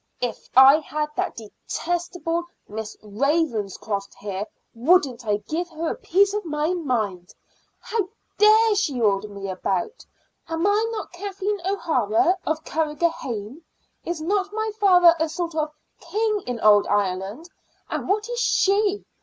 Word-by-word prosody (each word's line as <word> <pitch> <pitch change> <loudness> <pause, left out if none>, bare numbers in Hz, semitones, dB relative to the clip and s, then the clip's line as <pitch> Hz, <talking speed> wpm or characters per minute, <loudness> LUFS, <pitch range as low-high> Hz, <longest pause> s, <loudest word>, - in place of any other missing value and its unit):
"If 245 -1 -4
I 265 +3 +9
had 300 0 -3
that - - -2
detestable 340 - -3 0.2
Miss 220 +1 -6
Ravenscroft 215 - -1
here, 200 0 -5 0.3
wouldn't 250 -2 +2
I 205 -1 +2
give 345 +3 -2
her 325 0 -3
a - - -3
piece 400 -3 +2
of 420 0 -2
my 305 +1 -1
mind? 220 - -2 0.4
How 425 -4 -2 0.3
dare 435 +1 +6
she 345 -11 0
order 205 -2 +2
me 200 -1 -7
about? 190 - -2 0.5
Am 325 +2 -1
I 420 +3 +2
not 440 -2 -5
Kathleen 390 +2 -3
O'Hara 330 - +2
of 315 0 -1
Carrigrohane? 300 -6 -2 0.4
Is 345 -1 -3
not 390 +3 0
my 435 +1 -2
father 355 -4 +6
a 320 0 +1
sort 340 +1 -3
of 310 -1 -1 0.3
king 425 -1 -1
in 245 -2 -3
old 210 -1 +6
Ireland? 200 - -1 0.4
And - - -4
what 420 +2 +1
is 485 0 -3
she? 410 -2 +2
320 Hz, 140 wpm, -23 LUFS, -, 0.5 s, I